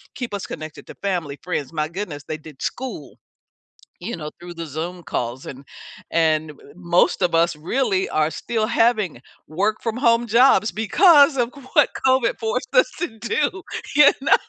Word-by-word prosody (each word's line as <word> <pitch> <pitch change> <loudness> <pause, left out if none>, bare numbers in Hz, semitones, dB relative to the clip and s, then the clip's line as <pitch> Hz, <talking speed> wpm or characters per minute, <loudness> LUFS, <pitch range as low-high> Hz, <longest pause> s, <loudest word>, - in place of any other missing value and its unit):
keep 245 -4 -5
us 200 - -4
connected 155 -1 -8
to - - -10
family, 170 -8 -2
friends. 165 -5 -3
My 155 -1 -1
goodness, 170 -5 -6
they 155 - -4
did 150 -2 -14
school, 260 -1 -5 0.8
you 235 - -5
know, 150 -2 -6
through 175 0 -9
the 165 -1 -6
Zoom 165 +4 -5
calls 125 -3 -4
and 135 +1 -9 0.5
and 155 -2 +1 0.2
most 175 +1 +2
of 175 -2 +1
us 170 +1 +3
really 190 - 0
are 155 0 +1
still 220 +7 -2
having 225 - +1 0.3
work 200 +7 0
from 225 0 -2
home 235 -1 +3
jobs 235 -1 +4
because 285 - +5
of 240 -1 0 0.2
what 295 -3 +5 0.2
COVID 260 -2 +2
forced 225 +2 -3
us - - +5
to 305 -11 -4
do, 300 - -1 0.3
you 295 -1 +8
know? 275 - +4
190 Hz, 165 wpm, -22 LUFS, 155-240 Hz, 0.8 s, you